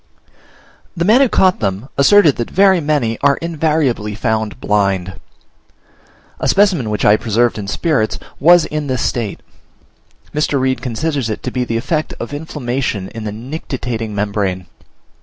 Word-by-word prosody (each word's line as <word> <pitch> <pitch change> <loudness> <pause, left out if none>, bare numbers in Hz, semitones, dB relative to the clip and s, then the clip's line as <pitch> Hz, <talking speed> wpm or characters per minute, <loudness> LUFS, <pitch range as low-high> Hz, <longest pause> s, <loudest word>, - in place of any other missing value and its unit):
The 170 - 0
man 225 +7 +5
who 270 - +4
caught 185 -3 +3
them 100 +3 -2
asserted 155 +1 +5
that 120 - -3
very 190 -1 +4
many 145 -7 0
are 140 0 +3
invariably 150 -10 -1
found 110 -1 -2
blind. 95 -4 0 1.2
A - - -1
specimen 190 - +3
which 105 -1 -1
I 105 - +6
preserved 115 +1 0
in 100 - -6
spirits 110 0 0 0.2
was 175 +2 +6
in 150 -1 -4
this 130 -3 -1
state; 115 -5 -2 0.9
Mr. 150 -2 0
Reid 130 0 0
considers 135 0 -2
it 110 - -4
to - - -3
be 125 - -1
the 115 -1 -2
effect 150 +6 -2
of 120 - -6
inflammation 130 -9 -3
in 115 -1 -8
the 105 - -3
nictitating 120 -2 -5
membrane. 100 -3 -2
125 Hz, 150 wpm, -17 LUFS, 110-155 Hz, 1.2 s, I